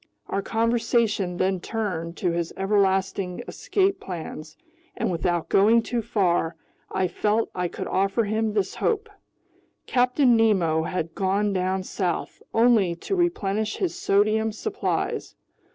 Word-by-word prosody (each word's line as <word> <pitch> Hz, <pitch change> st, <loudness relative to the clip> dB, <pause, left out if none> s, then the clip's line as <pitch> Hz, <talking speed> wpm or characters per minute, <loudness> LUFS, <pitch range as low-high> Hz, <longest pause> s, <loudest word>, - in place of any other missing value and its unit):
Our 195 Hz, -, -1 dB
conversation 225 Hz, -4 st, +1 dB
then 185 Hz, 0 st, +1 dB
turned 175 Hz, -6 st, -3 dB
to 180 Hz, -, 0 dB
his 170 Hz, -1 st, -2 dB
everlasting 195 Hz, -2 st, +1 dB
escape 390 Hz, -1 st, 0 dB
plans, 160 Hz, -3 st, -7 dB, 0.4 s
and -, -, 0 dB
without 175 Hz, -1 st, -1 dB
going 225 Hz, +4 st, +4 dB
too 235 Hz, +1 st, -1 dB
far, 175 Hz, -6 st, +1 dB, 0.4 s
I 190 Hz, -1 st, +1 dB
felt 210 Hz, +5 st, 0 dB
I 180 Hz, -1 st, -1 dB
could -, -, -6 dB
offer 195 Hz, +4 st, +1 dB
him 215 Hz, +1 st, -1 dB
this 200 Hz, -3 st, 0 dB
hope: 435 Hz, -1 st, -1 dB, 0.7 s
Captain 250 Hz, 0 st, +3 dB
Nemo 190 Hz, -8 st, +3 dB
had 165 Hz, -2 st, -3 dB
gone 200 Hz, +2 st, 0 dB
down 185 Hz, 0 st, 0 dB
south 185 Hz, -2 st, -3 dB
only 225 Hz, -7 st, +4 dB
to 280 Hz, -, -3 dB
replenish 220 Hz, -, 0 dB
his 370 Hz, -3 st, -1 dB
sodium 215 Hz, +2 st, +2 dB
supplies. 405 Hz, -, -3 dB
200 Hz, 130 wpm, -25 LUFS, 180-225 Hz, 0.7 s, going